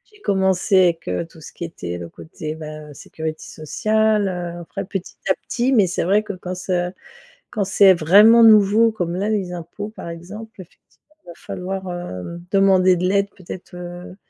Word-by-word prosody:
J'ai 415 - -21
commencé 190 - +2
avec 90 - -3
tout 165 - -16
ce - - -11
qui - - -8
était 90 - -6
le 85 -1 -8
côté, 120 - -8
bah, 155 -1 -9
heu, - - -11
sécurité 160 +2 -6
sociale, 215 +6 0
heu, 175 -2 -4
après 195 +3 -6
petit 190 -1 -6
à - - +6
petit, 250 +2 0
mais 210 -6 +4
c'est 175 - -2
vrai 200 +5 +2
que 210 -1 -5
quand 185 0 -6
ça 180 -1 -2 0.6
quand 210 - -1
c'est 195 0 +6
vraiment 205 +8 +6
nouveau 215 +1 +6
comme 175 -5 -3
là, 200 +3 -1
les 195 -5 -1
impôts 175 +5 -7
par 215 -5 -9
exemple, 195 +6 -9
effectivement 240 - -21
il - - -26
va - - -8
falloir, 190 +2 -6
hem, 170 - -7
demander 190 -2 +4
de 175 - -3
l'aide 200 +1 +1
peut-être, 185 -1 -10
heu, 175 0 -8
185 Hz, 185 wpm, -21 LUFS, 170-205 Hz, 0.6 s, à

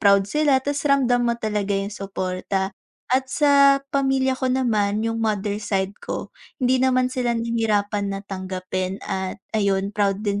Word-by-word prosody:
proud 200 -1 +5
sila, 285 +2 +2
tas 285 0 -1
ramdam 245 -3 +3
mo 235 - +1
talaga 210 -3 -1
yung 195 +1 -3
suporta. 190 -1 -3 0.4
At 260 0 +2
sa 280 -1 +5
pamilya 270 -1 +2
ko 260 0 -1
naman, 220 -5 +1
yung 225 0 -1
mother 210 -2 0
side 195 -2 -1
ko, - - -5 0.2
hindi 255 -1 +2
naman 255 -1 +2
sila 240 -2 0
nahirapan 215 -3 0
na 195 - -3
tanggapin 185 0 -4
at 190 -1 -3 0.2
ayun, 200 -2 +1
proud 205 0 0
din 205 0 0
215 Hz, 155 wpm, -23 LUFS, 195-255 Hz, 0.4 s, proud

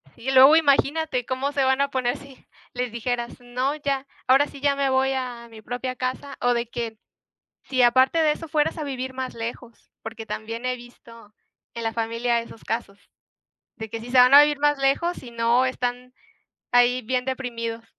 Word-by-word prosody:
Y 265 +3 -4
luego 270 +3 +8
imagínate 285 -3 +2
cómo 260 +3 -2
se 280 -1 0
van 265 +1 +2
a 280 - +1
poner 255 -1 -1
si 275 -1 -15 0.3
les 250 -1 -3
dijeras: 240 +1 -3
"No, 250 +3 -2
ya, 280 -2 -2 0.2
ahora 270 +3 +5
sí, 280 - -12
ya 285 0 +2
me 275 -1 0
voy 265 0 +2
a 245 -3 -5
mi 220 -1 -13
propia 250 +3 -4
casa" 255 +3 -4
o 245 0 +3
de 235 0 -1
que, 230 -1 -5 0.7
si 260 -2 0
aparte 260 +6 +4
de 310 -1 +4
eso, 330 - -9
fueras 310 +1 0
a 310 - -3
vivir 260 -2 -5
más 260 0 -5
lejos, 230 +1 -8
porque 225 0 -7
también 225 +3 -5
he 255 - 0
visto 230 -3 -15 0.4
en 235 - -6
la 225 0 -2
familia 230 +1 0
esos 230 -1 -13
casos 220 -3 -5 0.7
de 220 -1 -7
que 225 - -5
si 240 +2 -9
se 260 - 0
van 250 +1 +7
a 290 - +11
vivir 295 -1 +1
más 295 0 +2
lejos, 275 +6 0
y 245 - -10
no, 235 +2 +2
están 250 0 -4 0.6
ahí 245 +1 +4
bien 250 +2 -2
deprimidos. 230 -3 -4
255 Hz, 195 wpm, -24 LUFS, 235-275 Hz, 0.7 s, a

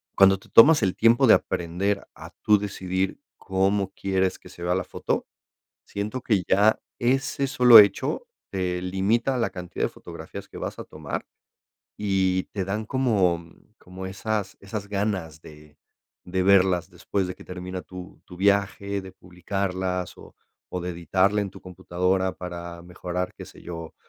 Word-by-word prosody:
cuando 95 0 +6
te - - -19
tomas 145 +4 +7
el 95 - +1
tiempo 115 +1 +4
de - - +8
aprender 95 +4 -2
a - - -11
tú 105 - +6
decidir 95 -2 -2 0.2
cómo 95 +1 0
quieres 95 -1 0
que - - -15
se 85 - -11
vea 90 +1 +1
la 95 - -1
foto. - - -2 0.6
Siento 105 +5 -4
que 105 -6 +1
ya 105 +3 +4 0.2
ese 135 +3 +1
sólo 125 -3 +8
hecho 105 - +3 0.2
te 90 -2 -2
limita 105 +8 0
la 115 - 0
cantidad 90 -1 -3
de - - -2
fotografías - - -10
que - - -10
vas - - -5
a - - -6
tomar 75 -2 -6 0.7
y 95 -2 +1
te 100 - -1
dan 105 +3 -3
como, 105 -10 +1 0.4
como 95 +1 -9
esas, 100 +1 -3
esas 100 +1 -6
ganas 95 -6 -2
de 75 -1 -15 0.5
de 95 0 0
verlas 95 -2 +4
después 100 -2 -2
de 90 - -5
que - - -14
termina 90 0 -6
tu 90 0 -11
tu 90 - -12
viaje, 100 0 +1
de 95 -1 -10
publicarlas, 90 0 -3
o - - -15 0.3
o 90 - -4
de 90 - -4
editarla 95 +5 +1
en 100 - -3
tu - - -14
computadora 90 +1 -1
para 85 -1 -7
mejorar, 90 0 -4
qué - - -9
sé - - -15
yo, 85 -2 -8
95 Hz, 160 wpm, -25 LUFS, 90-100 Hz, 0.7 s, de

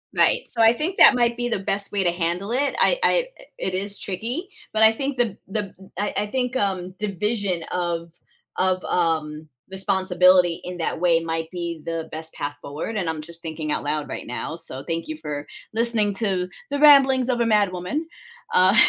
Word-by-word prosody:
Right, - - +3
so 235 - +3
I 225 +1 +7
think 330 +9 -3
that 265 - +8
might 235 -1 +2
be 240 0 -2
the 220 - -1
best 200 +1 -1
way 200 -2 0
to 175 - +2
handle 175 +4 -2
it, 275 +3 0
I - - +3
I - - +3 0.3
it 190 - -2
is 200 +2 -1
tricky, 235 - -4 0.2
but 220 0 +2
I 220 0 +7
think 270 +2 -3
the 225 -5 0
the 200 0 -3 0.2
I 205 +1 -1
I - - +1
think, 250 +2 -2
um, 185 -5 -1
division 200 -3 -1
of 170 -2 -2 0.5
of, 185 0 +1
um, 155 -3 -1 0.2
responsibility 185 -2 +3
in 180 0 -6
that 165 -1 -2
way 170 -1 +3
might 165 0 -3
be 170 -3 -5
the 165 -1 -4
best 160 +1 -4
path 145 0 -4
forward 155 +10 -5
and 180 -5 -1
I'm 155 -1 -3
just 170 +1 -9
thinking 160 -2 -4
out - - -1
loud 150 0 -2
right - - -7
now, 125 +5 -4
so 135 -5 -6
thank 165 0 -3
you 155 0 -5
for 150 -2 -5 0.3
listening 225 -3 +4
to 190 -5 0 0.2
the 285 - -1
ramblings 270 -4 +6
of 245 - +1
a 235 - +2
mad 210 -4 +3
woman, 230 - -3 0.5
uh, 185 +3 +5
185 Hz, 195 wpm, -23 LUFS, 165-225 Hz, 0.5 s, that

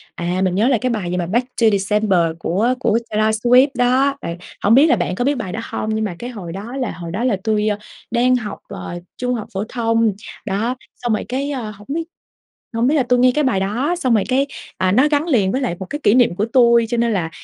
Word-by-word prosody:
à, 175 +2 -2
mình 185 -1 +1
nhớ 215 +5 +3
là 260 -2 +3
cái 255 - 0
bài 205 -7 -2
gì 180 - -1
mà 175 - -1
"Back 240 +7 0
To 225 - +6
December" 200 -1 +1 0.2
của 210 +10 +1
của 230 -4 +2
Taylor 215 +1 +1
Swift 250 +4 +5
đó. 260 +3 +2
Bạn 170 +1 -5 0.3
hổng 205 - +4
biết 285 +5 +6
là - - +4
bạn 180 0 -2
có 245 - -1
biết 285 +2 +2
bài 185 - -4
đó 220 - -4
hông? 215 - -3
Nhưng 220 0 0
mà 185 -4 -4
cái 245 - -5
hồi 200 -9 -7
đó 210 +7 -7
là 250 -5 -2
hồi 170 -1 -7
đó 205 +7 -2
là 250 -5 +2
tui, 215 -1 +1
ơ, 210 -1 0 0.3
đang 245 +2 +3
học, 220 -4 -4
ờ, 175 -3 -7 0.2
trung 250 0 -1
học 220 - -5
phổ 195 +1 -2
thông, 230 -2 +1 0.3
đó, 215 +5 -1 0.2
xong 240 -2 -2
rồi 215 - -2
cái, 275 +3 -2
ơ, 240 -6 -4
hổng 205 +1 -16
biết 325 +4 -1 0.7
hổng 230 +1 +1
biết 285 - +3
là 290 - +3
tui 250 0 +2
nghe 255 +1 +5
cái 300 - +1
bài 240 -8 +1
đó, 240 - 0
xong 255 -8 +1
rồi 210 - +2
cái, 265 +2 +2 0.3
à, 185 0 +2
nó 260 +8 +4
gắn 295 +1 +1
liền 205 - +2
với 260 - 0
lại 240 -10 -2
một 190 - -6
cái 290 - -3
kỷ 205 - +4
niệm 245 -7 +4
của 200 - 0
tui 235 -2 +5
cho 240 - -1
nên 235 -1 +1
là, 170 -5 -1
230 Hz, 265 wpm, -19 LUFS, 200-255 Hz, 0.7 s, To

